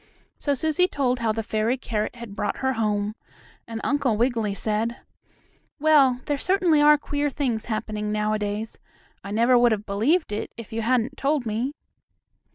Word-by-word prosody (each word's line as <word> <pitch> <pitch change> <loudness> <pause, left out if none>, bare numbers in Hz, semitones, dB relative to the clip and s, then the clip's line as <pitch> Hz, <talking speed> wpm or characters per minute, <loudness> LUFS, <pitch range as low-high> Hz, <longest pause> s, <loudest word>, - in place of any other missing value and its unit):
So 285 -1 0
Susie 315 +6 +2
told 255 -6 0
how 230 -2 +1
the 225 +1 -2
fairy 220 +4 0
carrot 220 -3 -3
had 235 -4 -9
brought 205 - -2
her 265 - +2
home, 210 -2 -1 0.5
and 225 -1 -5
Uncle 275 -6 +1
Wiggily 225 -4 0
said: 220 +3 -1 0.8
"Well, 280 -5 +4
there 290 - 0
are 280 - -2
certainly 360 -4 +3 0.2
queer 290 0 -2
things 250 -6 -2
happening 215 -1 -3
nowadays. 210 0 -2 0.4
I 200 - -7
never 235 +4 +4
would 240 -1 +5
have 210 -1 -1
believed 230 - +1
it 210 - -4
if 230 -2 -9
you 225 - -1
hadn't 250 +3 0
told 280 -2 0
me." 230 +6 -2
235 Hz, 165 wpm, -24 LUFS, 215-275 Hz, 0.8 s, would